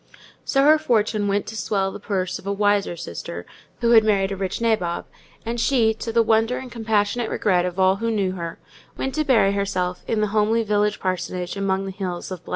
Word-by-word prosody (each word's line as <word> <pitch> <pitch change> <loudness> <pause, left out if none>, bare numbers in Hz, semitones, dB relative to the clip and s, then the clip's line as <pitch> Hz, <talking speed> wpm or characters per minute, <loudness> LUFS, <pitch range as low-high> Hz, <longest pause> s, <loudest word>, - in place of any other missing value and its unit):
So 275 0 +2
her 305 +2 +6
fortune 215 -6 +1
went 200 0 0
to 220 - -7
swell 195 -3 -1
the - - -8
purse 190 -3 -2
of 195 - -12
a - - 0
wiser 205 -3 +1
sister, 85 - -7 0.4
who 235 -1 +3
had 225 -2 +7
married 200 -2 +2
a - - -2
rich 190 -1 -3
nabob; 215 -7 0 0.4
and 235 +1 -3
she, 230 -2 +3
to 225 +1 -5
the 230 0 +4
wonder 225 +2 +2
and 260 -2 -8
compassionate 220 0 0
regret 180 -3 +1
of 180 +1 -4
all 190 +1 +4
who 230 +2 -2
knew 200 -4 0
her, 170 -3 -6 0.4
went 265 - -2
to 310 - 0
bury 230 -8 +4
herself 185 -3 -2
in 225 - 0
the 210 -1 +1
homely 220 +2 +2
village 210 0 +1
parsonage 180 -1 -3
among 195 -1 -1
the 195 - -4
hills 185 -2 -5
of 185 -3 -6
——. - - -12
205 Hz, 215 wpm, -23 LUFS, 190-225 Hz, 0.4 s, had